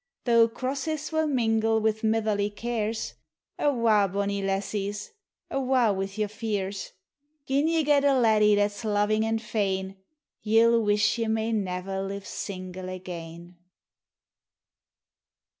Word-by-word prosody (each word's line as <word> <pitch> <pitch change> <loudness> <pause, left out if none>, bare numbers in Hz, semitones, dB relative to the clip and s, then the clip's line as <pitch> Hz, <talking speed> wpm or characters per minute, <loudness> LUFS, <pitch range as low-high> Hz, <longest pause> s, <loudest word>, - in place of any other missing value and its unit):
Though 230 -2 +5
crosses 280 +6 -3
will 315 0 +1
mingle 225 -4 +2
wi' 220 0 +3
mitherly 215 -2 +1
cares, 225 0 -3 0.5
Awa', 230 -7 +3
bonnie 200 0 -1
lassies 200 +1 -3 0.2
— - - -39
awa' 255 -5 +2
wi' 195 0 -2
your 215 -1 0
fears; 205 -3 -4 0.3
< 290 0 -49
Jin 280 +3 +2
ye 325 -1 +2
get 285 -1 +3
a 280 -1 +4
laddie 215 -3 +4
that 205 0 +2
's 205 +3 -10
loving 215 0 +1
and 225 0 0
fain, 195 -3 -2 0.4
Ye 220 +1 +3
'11 230 -1 +4
wish 210 +2 +2
ye 225 - 0
may 220 +1 0
never 190 -2 -2
live 195 0 -5
single 185 -1 -6
again. 175 -1 -8
215 Hz, 135 wpm, -27 LUFS, 200-235 Hz, 0.5 s, Though